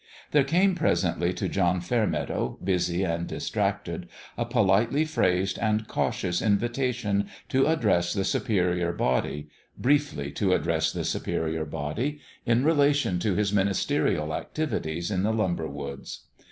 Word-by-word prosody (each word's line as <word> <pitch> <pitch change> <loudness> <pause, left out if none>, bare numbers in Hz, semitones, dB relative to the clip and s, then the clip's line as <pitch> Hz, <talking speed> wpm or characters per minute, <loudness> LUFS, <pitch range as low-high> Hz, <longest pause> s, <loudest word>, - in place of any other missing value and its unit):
There 145 -2 +5
came 180 +7 +3
presently 90 - +1
to - - -2
John 90 -1 +1
Fairmeadow, 110 +4 -1
busy 90 -1 +1
and 85 -2 -1
distracted, - - -2 0.3
a - - -1
politely 115 +10 +2
phrased 95 - +1
and 110 0 0
cautious 90 -4 -1
invitation 115 -1 0 0.2
to 135 +2 +3
address 105 - +2
the 100 0 0
Superior 90 -5 0
Body 75 +1 -1 0.3
briefly 140 - +1
to 95 +4 +1
address - - +1
the - - -3
Superior 80 -1 -2
Body 80 - -3 0.3
in 120 +2 +3
rela 145 -2 +4
tion 95 -11 0
to 100 -1 0
his 105 +1 +1
ministerial 95 -6 +1
activities 85 - -3
in 95 -2 0
the 105 +3 +1
lumber 90 -7 0
woods. 70 -1 -7
100 Hz, 135 wpm, -27 LUFS, 85-125 Hz, 0.3 s, There